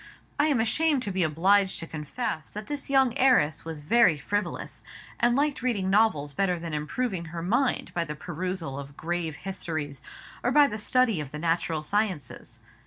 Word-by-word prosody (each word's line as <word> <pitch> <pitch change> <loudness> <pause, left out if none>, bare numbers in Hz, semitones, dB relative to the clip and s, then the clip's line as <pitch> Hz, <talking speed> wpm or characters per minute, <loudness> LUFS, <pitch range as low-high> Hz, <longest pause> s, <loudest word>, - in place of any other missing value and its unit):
I 295 - +4
am 285 -6 +2
ashamed 280 +5 +2
to 205 - -3
be 185 0 -1
obliged 190 +5 +3
to 165 - -6
confess 155 - -4
that 210 +1 -7
this 290 +1 -5
young 265 -3 +3
heiress 165 - +3
was 160 -2 -5
very 170 0 +4
frivolous, 205 +8 -3 0.4
and 240 0 +3
liked 285 0 +1
reading 205 -7 0
novels 175 -9 +2
better 180 +1 +1
than 165 -1 -6
improving 170 +5 -2
her 165 +1 -6
mind 245 +8 0
by 170 -1 0
the 150 -1 -5
perusal 170 -3 -4
of 140 0 -10
grave 165 -1 -2
histories, 160 -7 -4 0.4
or 245 - +2
by 295 +1 +7
the 220 -6 -3
study 225 -5 +2
of 145 - -6
the 150 - -7
natural 165 -1 0
sciences. 190 - -3
185 Hz, 175 wpm, -27 LUFS, 155-240 Hz, 0.4 s, by